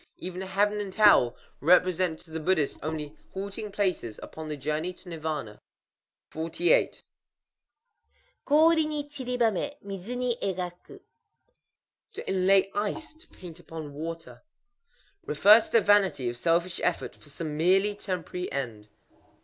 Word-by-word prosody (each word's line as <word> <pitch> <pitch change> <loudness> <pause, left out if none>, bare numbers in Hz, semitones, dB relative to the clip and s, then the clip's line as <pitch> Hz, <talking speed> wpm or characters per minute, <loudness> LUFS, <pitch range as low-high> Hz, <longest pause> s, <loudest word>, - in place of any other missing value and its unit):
Even 185 0 -6
Heaven 200 +2 +1
and 195 -2 -5
Hell 205 - +6 0.2
represent 180 +1 +3
to 160 - -17
the 160 - -3
Buddhist 155 -3 0
only 155 -1 -4 0.2
halting 200 +2 -5
places 185 - -2
upon 160 0 -8
the 150 -1 -4
journey 155 +5 -2
to 180 - -15
Nirvâna. 155 -10 -4 0.7
48.—Kori 300 - -1
wo 300 -1 -2
chiribamé; 250 -4 -1
midzu 200 +4 -6
ni 250 -1 0
égaku. 185 - -5 1.1
To 415 - -8
inlay 190 +1 +3
ice; 210 +11 -3
to 320 +4 -20
paint 175 -2 -12
upon 160 -3 -8
water. 165 +2 -7 0.8
Refers 215 -7 +6
to - - -19
the 230 - +6
vanity 195 -10 +3
of 120 - -5
selfish 170 +5 +1
effort - - -1
for 150 - -16
some 155 +1 -5
merely 190 +6 +3
temporary 180 -3 -5
end. 115 -6 -4
185 Hz, 125 wpm, -27 LUFS, 160-210 Hz, 1.1 s, Hell